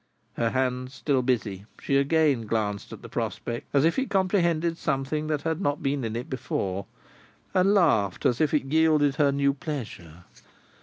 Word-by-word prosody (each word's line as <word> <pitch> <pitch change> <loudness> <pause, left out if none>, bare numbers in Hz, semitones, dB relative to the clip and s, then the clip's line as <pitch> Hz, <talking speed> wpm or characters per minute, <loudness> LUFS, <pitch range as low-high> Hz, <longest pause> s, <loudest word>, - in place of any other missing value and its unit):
Her 115 - 0
hands 130 +1 -1
still 135 0 +1
busy, 105 -6 -1
she 140 - -1
again 140 -4 +2
glanced 105 -2 -2
at - - -10
the - - -7
prospect, 120 0 -4
as 140 +1 +3
if 165 +9 +2
it 265 - -2
comprehended 170 -4 +1
something 150 +1 -1
that 150 -2 -1
had 160 +2 -1
not 145 -4 -1
been 135 -1 0
in 115 -1 -3
it 120 +2 -4
before, 100 -7 -3 0.7
and 195 +2 +4
laughed 110 - +2
as 125 +2 +2
if 155 - +2
it 150 -3 +1
yielded 150 -1 +3
her 145 -2 +4
new 140 0 +2
pleasure. 105 - -7
140 Hz, 170 wpm, -26 LUFS, 120-155 Hz, 0.7 s, and